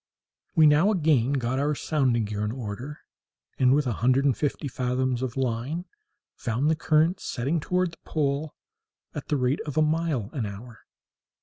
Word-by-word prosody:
We 160 Hz, -2 st, +6 dB
now 150 Hz, +6 st, +5 dB
again 150 Hz, -, +2 dB
got 130 Hz, -1 st, 0 dB
our 145 Hz, +1 st, +1 dB
sounding 130 Hz, -7 st, +1 dB
gear 105 Hz, 0 st, -3 dB
in 105 Hz, -, -1 dB
order, 125 Hz, +4 st, -6 dB, 0.6 s
and, 125 Hz, -1 st, +5 dB
with 145 Hz, +2 st, +3 dB
a 125 Hz, -, 0 dB
hundred 130 Hz, +3 st, +3 dB
and 135 Hz, -4 st, +3 dB
fifty 145 Hz, 0 st, -2 dB
fathoms 125 Hz, -1 st, -1 dB
of 130 Hz, -1 st, -3 dB
line, 130 Hz, +7 st, -2 dB, 0.5 s
found 125 Hz, +6 st, 0 dB
the -, -, +2 dB
current 160 Hz, +3 st, +2 dB
setting 140 Hz, +4 st, -1 dB
toward 180 Hz, +3 st, 0 dB
the -, -, -15 dB
pole 145 Hz, 0 st, -1 dB, 0.6 s
at 145 Hz, -, -6 dB
the 150 Hz, -, +1 dB
rate 130 Hz, +2 st, 0 dB
of 150 Hz, -, -5 dB
a 155 Hz, -, +5 dB
mile 155 Hz, -8 st, 0 dB
an 120 Hz, -7 st, -2 dB
hour. 110 Hz, +4 st, -9 dB
135 Hz, 175 wpm, -26 LUFS, 125-155 Hz, 0.6 s, We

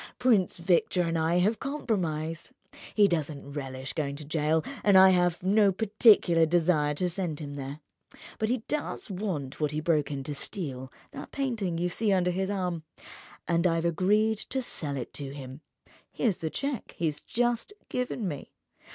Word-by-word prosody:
Prince 220 Hz, -8 st, +3 dB
Victor 175 Hz, +1 st, +2 dB
and 165 Hz, -1 st, -1 dB
I 165 Hz, +2 st, +2 dB
have 205 Hz, +5 st, +2 dB
compromised. 170 Hz, -, -2 dB, 0.4 s
He 205 Hz, -2 st, +6 dB
doesn't 150 Hz, -5 st, -3 dB
relish 135 Hz, -2 st, -5 dB
going 140 Hz, -2 st, -2 dB
to 150 Hz, +1 st, -9 dB
jail, 155 Hz, +1 st, +1 dB, 0.2 s
and 200 Hz, -2 st, +6 dB
I've 180 Hz, -2 st, +5 dB
no 200 Hz, +1 st, +4 dB
particular 200 Hz, -5 st, +4 dB
desire 160 Hz, -3 st, +2 dB
to 180 Hz, +5 st, 0 dB
send 175 Hz, -4 st, -3 dB
him 145 Hz, -2 st, -6 dB
there. 140 Hz, +2 st, -6 dB, 0.6 s
But 220 Hz, -, 0 dB
he 245 Hz, -2 st, 0 dB
does 300 Hz, -7 st, -3 dB
want 180 Hz, -9 st, -4 dB
what 150 Hz, -, +2 dB
he 150 Hz, +1 st, -2 dB
broke 155 Hz, -2 st, +1 dB
in 140 Hz, -2 st, -4 dB
to 145 Hz, -, -4 dB
steal—that 135 Hz, -4 st, -5 dB
painting 225 Hz, -11 st, -2 dB
you 175 Hz, +1 st, 0 dB
see 205 Hz, +4 st, 0 dB
under 180 Hz, -2 st, +2 dB
his 190 Hz, +2 st, -1 dB
arm—and 170 Hz, -1 st, -3 dB
I've 165 Hz, -1 st, 0 dB
agreed 210 Hz, +6 st, +2 dB
to 265 Hz, +3 st, -3 dB
sell 145 Hz, -, -3 dB
it 125 Hz, -, -6 dB
to 140 Hz, -1 st, -7 dB
him. 135 Hz, 0 st, -9 dB, 0.5 s
Here's 215 Hz, -7 st, 0 dB
the 160 Hz, -, -3 dB
cheque 275 Hz, -, -4 dB
he 170 Hz, -, -1 dB
has 150 Hz, -2 st, -1 dB
just 240 Hz, -, -1 dB, 0.2 s
given 250 Hz, -4 st, -2 dB
me. 145 Hz, -5 st, -6 dB
175 Hz, 165 wpm, -28 LUFS, 150-205 Hz, 0.6 s, He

